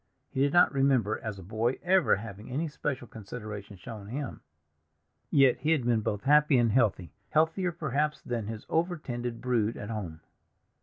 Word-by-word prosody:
He 130 - -1
did 140 0 +3
not 175 -2 +5
remember, 130 -6 +2
as 110 -3 -5
a 95 - -9
boy, 110 +7 -1
ever 185 -1 +4
having 105 +1 -8
any 150 +6 -1
special 145 -3 -3
consideration 105 -2 -8
shown 105 +1 -9
him; 135 +3 -5 0.9
yet 135 -3 +5
he 155 +3 +2
had 140 -7 0
been 120 -2 +2
both 105 -1 -2
happy 150 0 +5
and 120 -2 +3
healthy, 100 - +1 0.2
healthier 165 +4 +2
perhaps 150 -1 -1
than 115 -4 -4
his 110 -1 -6
over 170 +2 0
tended 120 -4 -5
brood 115 -3 0
at 105 - -6
home. 85 -8 -5
120 Hz, 170 wpm, -29 LUFS, 110-145 Hz, 0.9 s, not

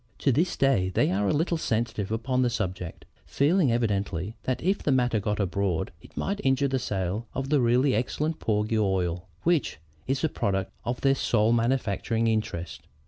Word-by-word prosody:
To 140 - +2
this 165 +8 +1
day, 130 -10 +3
they 95 - +2
are 100 +2 +1
a - - +2
little 165 +2 0
sensitive 110 -5 -1
upon 125 +3 0
the 125 - +3
subject, 95 -6 -4 0.2
feeling 150 0 +3
evidently 100 -4 -1
that 130 - 0
if 190 +4 +2
the 150 - +1
matter 125 -4 +2
got 105 +1 -2
abroad, 95 -3 -1
it - - -17
might 200 +1 -2
injure 135 +1 +2
the 135 -1 0
sale 100 -1 -2
of 135 +1 -3
the 145 -2 +3
really 125 +3 +3
excellent 150 +7 -1
porgy 110 +1 0
oil 95 -3 0 0.2
which 170 -5 +1 0.3
is 135 +1 0
the 160 - +1
product 95 -5 -1
of 120 +1 -2
their 135 0 +4
sole 115 -4 +2
manufacturing 115 -1 0
interest. 105 -7 -2
115 Hz, 180 wpm, -27 LUFS, 100-135 Hz, 0.3 s, their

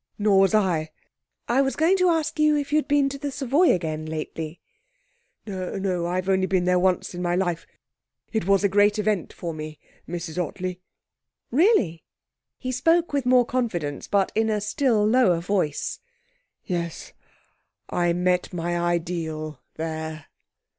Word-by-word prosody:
'Nor 205 -2 +4
was 195 +2 +4
I.' 175 -7 +1 0.6
'I 250 +3 +3
was 270 -3 0
going 330 +5 +3
to 365 -1 +3
ask 320 -2 0
you 305 0 +4
if 285 0 -3
you'd 305 -2 +2
been 285 -1 +3
to 275 0 -7
the 285 0 -3
Savoy 285 +5 +2
again 155 -3 -2
lately?' 160 +1 -5 0.9
'No; 185 -2 -2
I've 185 +1 -2
only 190 -1 +2
been 185 -2 +1
there 180 0 +3
once 185 0 +1
in 175 - -5
my 175 0 0
life. 175 -3 -1 0.7
It 220 -5 -1
was 195 0 +4
a - - +5
great 205 +2 +3
event 210 -4 0
for 170 -2 -5
me, 155 0 -7 0.3
Mrs 175 0 -3
Ottley.' 180 +2 -5 0.7
'Really?' 255 - +3 0.5
He 255 - -4
spoke 330 +6 +2
with 275 -3 0
more 250 -1 +5
confidence, 175 - -2
but 200 -2 +1
in 220 +1 +1
a 215 -1 +1
still 220 0 +1
lower 215 -6 +4
voice. 175 -4 -1 0.7
'Yes. 170 -3 -4 0.8
I 175 -1 +2
met 180 +1 +1
my 175 0 -2
ideal 165 -4 -2
there.' 160 -1 -5
190 Hz, 155 wpm, -24 LUFS, 170-245 Hz, 0.9 s, a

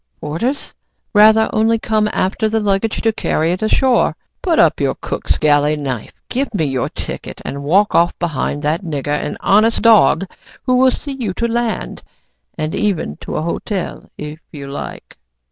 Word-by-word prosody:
"P - - -55
p - - -44
porters?" 230 - -3 0.4
"Rather, 220 +1 +6
only 225 +1 +3
come 215 -1 0
after 205 +4 0
the 220 +1 +1
luggage 205 +1 0
to 225 -1 +2
carry 160 -5 0
it 180 - -2
ashore. 245 +3 +3
So - - -10 0.3
put 340 -4 +1
up - - +4
your - - +1
cook's - - -2
galley 150 0 +3
knife, 135 -6 -4
give 265 +1 -2
me 160 - +1
your 135 -3 -1
ticket, - - -6
and 140 - -4
walk 190 +9 +3
off 170 +1 +3
behind 150 -3 -2
that 155 +5 0
nigger 145 -5 -4
an 150 - -3
honest 215 +3 +3
dog, 220 -3 +5 0.4
who 255 - +1
will 260 +1 +5
see 280 +2 -3
you 225 -9 -3
to 235 - 0
land, 235 -1 -2 0.6
and 155 0 -2
even 205 - 0
into 75 - -7
a - - -1
hotel, 180 +3 -4
if 150 +1 -7
you 140 -3 -8
like." 140 - -8
195 Hz, 180 wpm, -18 LUFS, 150-225 Hz, 0.6 s, Rather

